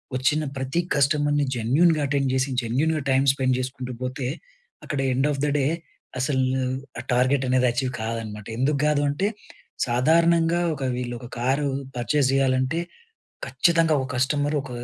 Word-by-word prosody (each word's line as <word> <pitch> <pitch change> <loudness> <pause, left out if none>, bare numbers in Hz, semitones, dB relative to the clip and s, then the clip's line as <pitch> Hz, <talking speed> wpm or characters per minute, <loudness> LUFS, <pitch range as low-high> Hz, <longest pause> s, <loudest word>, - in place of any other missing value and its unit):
వచ్చిన 150 +4 +1
ప్రతి 135 +6 -1
కస్టమర్‌ని 145 0 +2
జెన్యూన్‌గా 150 +8 +3
అటెండ్ 140 -1 0
చేసి, 130 +1 +1
జెన్యూన్‌గా 150 +7 0
టైమ్ 135 +1 +3
స్పెండ్ 130 -2 +1
చేసుకుంటూ 130 -1 -5
పోతే, 130 0 -3 0.6
అక్కడ 145 - -3
ఎండ్ 135 +3 +1
ఆఫ్ 140 - -4
ద - - +1
డే 135 - +2 0.5
అసలు 130 0 +1 0.6
ఆ - - -4
టార్గెట్ 130 +2 +2
అనేది 130 0 +3
అచీవ్ 125 +1 -1
కాదనమాట. 110 -2 -5
ఎందుకు 140 +3 +1
కాదంటే, 145 +4 +1 0.6
సాధారణంగా 165 +6 +3
ఒక 140 -2 -6
వీళ్ళు 120 -1 -4
,ఒక 120 - -9
కారు 135 +4 +1 0.3
పర్చేజ్ 135 +3 +1
చేయాలంటే, 130 +3 +1 0.7
ఖచ్చితంగా 165 -2 +3
ఒక 130 - -4
కస్టమర్ 145 +3 +1
ఒక 135 - -10
135 Hz, 140 wpm, -24 LUFS, 130-150 Hz, 0.7 s, జెన్యూన్‌గా